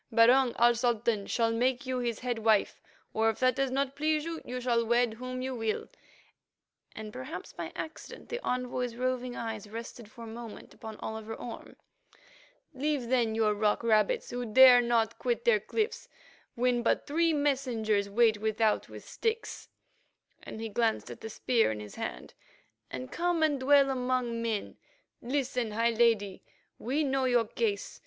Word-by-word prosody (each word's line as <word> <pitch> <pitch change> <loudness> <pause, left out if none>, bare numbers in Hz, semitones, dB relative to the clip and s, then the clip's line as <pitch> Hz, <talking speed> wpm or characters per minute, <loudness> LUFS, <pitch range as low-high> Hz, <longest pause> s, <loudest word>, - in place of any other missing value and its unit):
Barung, 240 +2 +5
our 240 +1 +5
Sultan, 235 -3 0
shall 230 -1 +1
make 250 +4 0
you 255 -1 -2
his 235 -3 -2
head 245 -2 -2
wife; 220 -2 +2 0.3
or, 220 +1 +2
if 220 - -2
that 255 0 +4
does 275 -1 0
not 270 +1 -1
please 305 +1 0
you, 330 -1 -5
you 250 +1 -5
shall 240 -2 +1
wed 235 0 +2
whom 255 +2 -5
you 260 0 -3
will"—and, 220 -1 -8
perhaps 130 +8 -7
by 170 -2 -6
accident, 315 0 -8
the 480 +1 -4
envoy's 250 -1 -2
roving 250 0 -2
eyes 220 -2 -5
rested 230 0 -8
for 230 +1 -12
a - - -8
moment 230 0 -9
upon 220 -1 -9
Oliver 220 0 -5
Orme. 240 - -9 1.0
"Leave, 275 -2 -1
then, 235 -4 +2
your 220 -1 +2
rock 210 +2 +1
rabbits, 215 -3 +2
who 245 0 -3
dare 245 +2 +8
not 230 -2 +1
quit 240 -2 -1
their 225 -3 +5
cliffs 445 - -3 0.5
when 245 0 +1
but 235 - +1
three 330 +3 +2
messengers 245 -9 0
wait 220 0 +3
without 220 0 +1
with - - -11
sticks," 450 -1 -3 0.7
and - - -9
he 225 - -3
glanced 225 +1 0
at - - -10
the 220 - -6
spear 230 - +1
in 105 - -5
his 105 -1 -9
hand, - - -6 0.6
"and 130 0 -7
come 350 -1 0
to 315 - +5
dwell 275 +1 +4
among 250 -2 -1
men. 225 -3 -3 0.4
Listen, 250 -3 -2
high 230 +2 +2
Lady; 220 -4 +2 0.4
we 275 +6 0
know 270 -2 0
your 245 -2 +3
case. 210 -2 -2
235 Hz, 165 wpm, -30 LUFS, 220-255 Hz, 1.0 s, dare